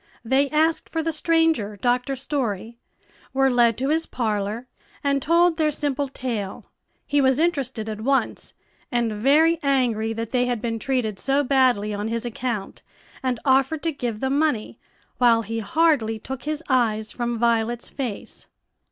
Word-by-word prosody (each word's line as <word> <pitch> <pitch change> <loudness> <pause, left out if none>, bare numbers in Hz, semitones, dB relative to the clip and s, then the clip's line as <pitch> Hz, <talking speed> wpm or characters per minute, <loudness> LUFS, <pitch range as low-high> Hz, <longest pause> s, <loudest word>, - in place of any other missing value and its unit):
They 270 +4 +2
asked 315 +2 +1
for 325 -1 -2
the 325 - 0
stranger, 320 -9 +1
Dr. 250 +4 0
Story, 235 -5 -3 0.5
were 270 0 +3
led 235 -2 +3
to 265 +3 -1
his 320 +2 +1
parlor, 215 0 -2 0.4
and 280 -1 +1
told 335 +2 +3
their 310 -2 +2
simple 285 -1 -1
tale. 235 -7 -5 0.4
He 290 0 +2
was 265 -1 +3
interested 270 -9 0
at 215 -1 -5
once, 270 +4 -1 0.4
and 235 -3 0
very 300 +9 +3
angry 245 -6 +1
that 230 0 -5
they 250 -1 +1
had 245 -2 -1
been 225 0 -3
treated 225 -6 -1
so 275 +2 +2
badly 250 -6 +2
on 205 +1 -3
his 230 +1 -2
account, 235 -3 -4 0.4
and 255 -3 -1
offered 270 +3 +2
to 330 - +1
give 240 -7 -4
them 270 +2 +1
money, 295 -9 -1 0.4
while 235 -2 +4
he 225 +2 -4
hardly 235 -2 +2
took 260 +4 -7
his 305 +1 -3
eyes 220 -5 +1
from 240 -1 -2
Violet's 235 0 0
face. 245 -7 -6
250 Hz, 160 wpm, -23 LUFS, 225-285 Hz, 0.5 s, while